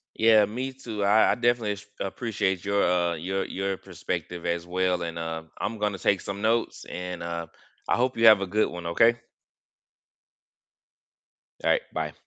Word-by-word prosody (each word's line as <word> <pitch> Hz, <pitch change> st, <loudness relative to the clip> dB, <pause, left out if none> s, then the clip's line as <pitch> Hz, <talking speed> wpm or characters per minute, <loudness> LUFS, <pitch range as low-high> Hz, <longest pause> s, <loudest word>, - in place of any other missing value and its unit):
Yeah, 110 Hz, -1 st, +6 dB
me 125 Hz, +6 st, -4 dB
too, 115 Hz, -6 st, -5 dB
I 105 Hz, +2 st, +5 dB
I -, -, +2 dB
definitely 120 Hz, -3 st, +1 dB
as 105 Hz, 0 st, -9 dB
appreciate 95 Hz, -3 st, -2 dB
your, 100 Hz, 0 st, +2 dB
uh 85 Hz, -1 st, +2 dB
your 95 Hz, +4 st, -2 dB
your 95 Hz, 0 st, -3 dB
perspective 90 Hz, 0 st, -5 dB
as 85 Hz, 0 st, -1 dB
well, 90 Hz, 0 st, 0 dB
and, 85 Hz, 0 st, -4 dB
uh, 80 Hz, -1 st, -4 dB, 0.2 s
I'm 110 Hz, 0 st, -3 dB
gonna 105 Hz, -2 st, -1 dB
take 100 Hz, +1 st, +2 dB
some 100 Hz, +1 st, -6 dB
notes 115 Hz, +1 st, 0 dB
and, 90 Hz, -1 st, -5 dB
uh, 85 Hz, 0 st, -4 dB, 0.4 s
I -, -, +3 dB
hope 125 Hz, +1 st, +1 dB
you 115 Hz, 0 st, +4 dB
have 110 Hz, -3 st, +9 dB
a 95 Hz, -, -1 dB
good 105 Hz, +4 st, +1 dB
one, 90 Hz, -1 st, -7 dB
okay? 115 Hz, +7 st, +3 dB, 2.4 s
Alright, -, -, +3 dB
bye. -, -, -3 dB
100 Hz, 165 wpm, -26 LUFS, 90-110 Hz, 2.4 s, have